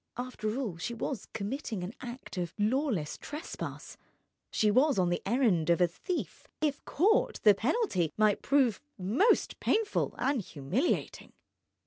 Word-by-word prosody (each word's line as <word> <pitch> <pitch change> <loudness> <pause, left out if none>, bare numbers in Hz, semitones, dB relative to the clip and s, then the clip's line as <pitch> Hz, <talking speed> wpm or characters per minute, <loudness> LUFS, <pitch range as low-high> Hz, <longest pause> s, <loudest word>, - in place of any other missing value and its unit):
After 245 -3 -3
all, 215 -11 -3
she 235 +8 -4
was 235 +1 -4
committing 220 -1 -4
an 185 +5 -5
act 250 0 -8
of 175 -2 -3
lawless 215 - 0
trespass, 300 +3 -7 0.5
she 210 -1 +2
was 265 +4 +4
on 180 -2 +3
the 175 - -1
errand 205 - +2
of 170 - +4
a 180 - +6
thief; 220 - -5
if 295 -2 -1
caught 410 +8 +2
the 210 - +8
penalty 215 - 0
might 215 -1 +3
prove 265 -7 +2 0.2
most 225 - +2
painful 435 -1 +1
and 270 -3 +1
humiliating. 175 - -2
225 Hz, 140 wpm, -30 LUFS, 185-275 Hz, 0.5 s, the